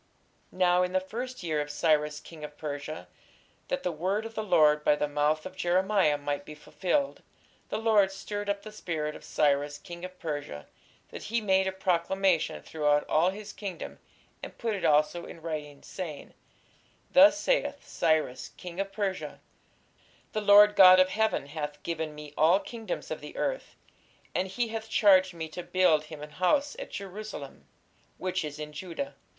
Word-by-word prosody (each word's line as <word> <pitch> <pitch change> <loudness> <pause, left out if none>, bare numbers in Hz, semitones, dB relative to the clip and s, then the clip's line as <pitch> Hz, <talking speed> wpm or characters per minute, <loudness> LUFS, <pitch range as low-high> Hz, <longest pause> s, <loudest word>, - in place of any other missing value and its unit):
Now 180 -1 +3
in 180 0 -1
the 185 - +3
first 240 +5 -6
year 155 -3 0
of 145 - -5
Cyrus 150 -1 +1
king 160 -1 -12
of 150 0 -8
Persia, 150 +1 -6 0.6
that 270 0 -2
the 180 - 0
word 190 +7 -1
of 225 - -7
the 220 - -2
Lord 155 -7 +4
by 150 - +4
the 150 - -1
mouth 150 +1 0
of 185 0 -8
Jeremiah 185 -3 +2
might 145 0 -3
be 150 - -10
fulfilled, 200 - -1 0.5
the - - -2
Lord 215 -3 +3
stirred 205 +1 -5
up 200 0 -1
the 215 - -9
spirit 160 -7 -4
of - - -11
Cyrus 145 0 +1
king 170 +3 -10
of 185 0 -8
Persia, 145 - -5 0.4
that - - -8
he 235 +2 0
made 190 -3 +2
a - - 0
proclamation 190 -1 0
throughout 150 -2 +1
all 165 +4 +3
his 210 +2 -7
kingdom, 190 -5 -7 0.4
and - - -9
put 230 -2 -1
it 200 - -4
also 155 +3 +2
in 170 - -10
writing, 150 -3 -6
saying, 165 -6 -7 0.8
Thus 295 +2 +7
saith - - 0
Cyrus 150 -6 0
king 180 0 -8
of 195 0 -2
Persia, 195 -2 -3 0.9
The 215 - -2
Lord 205 0 +7
God 185 -1 +9
of 185 0 +5
heaven 220 -5 0
hath 150 0 -6
given 160 -2 -3
me 150 -1 -10
all 165 +5 +5
kingdoms 225 0 -6
of - - -4
the - - -10
earth; - - -3 0.6
and 190 - 0
he 230 +5 -2
hath 220 0 -5
charged 185 -4 +5
me 160 -1 -4
to 180 - -6
build 175 -4 +2
him 150 -1 -9
an 150 - -9
house 280 - +1
at - - -6
Jerusalem, 200 -7 -8 0.5
which 185 -1 -2
is 150 -1 -6
in 150 0 -7
Judah. 180 - -5
180 Hz, 175 wpm, -28 LUFS, 150-200 Hz, 0.9 s, God